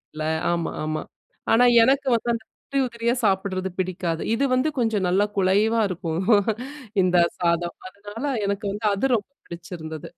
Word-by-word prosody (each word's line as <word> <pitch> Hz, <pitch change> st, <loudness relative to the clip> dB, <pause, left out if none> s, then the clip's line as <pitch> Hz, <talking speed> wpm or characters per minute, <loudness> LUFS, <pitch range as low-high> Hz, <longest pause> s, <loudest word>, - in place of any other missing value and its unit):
இல்ல. 155 Hz, -, -4 dB, 0.3 s
ஆமா, 170 Hz, -1 st, -2 dB
ஆமா. 155 Hz, 0 st, -2 dB, 0.5 s
ஆனா, 240 Hz, +2 st, +6 dB, 0.2 s
எனக்கு 270 Hz, +3 st, +2 dB
வந்து 235 Hz, +1 st, -2 dB
அந்த 225 Hz, -1 st, -4 dB, 0.2 s
உதிரி, 275 Hz, -1 st, -2 dB
உதிரியா 235 Hz, 0 st, -1 dB
சாப்பட்றது 190 Hz, -1 st, 0 dB
பிடிக்காது. 180 Hz, -3 st, -2 dB
இது 275 Hz, -, 0 dB
வந்து 255 Hz, +5 st, +2 dB
கொஞ்சம் 220 Hz, -5 st, +1 dB
நல்லா 190 Hz, +3 st, +3 dB
குலைவா 205 Hz, +4 st, +3 dB
இருக்கும் 170 Hz, -1 st, -3 dB, 0.8 s
இந்த 180 Hz, -1 st, +3 dB, 0.2 s
சாதம். 170 Hz, 0 st, 0 dB
அதனால 205 Hz, +5 st, -9 dB, 0.2 s
எனக்கு 200 Hz, +1 st, -2 dB
வந்து 210 Hz, +1 st, -5 dB
அது 255 Hz, +6 st, +1 dB
ரொம்ப 205 Hz, -, -8 dB, 0.2 s
பிடிச்சிருந்தது. 170 Hz, -3 st, -8 dB
195 Hz, 145 wpm, -24 LUFS, 175-230 Hz, 0.8 s, ஆனா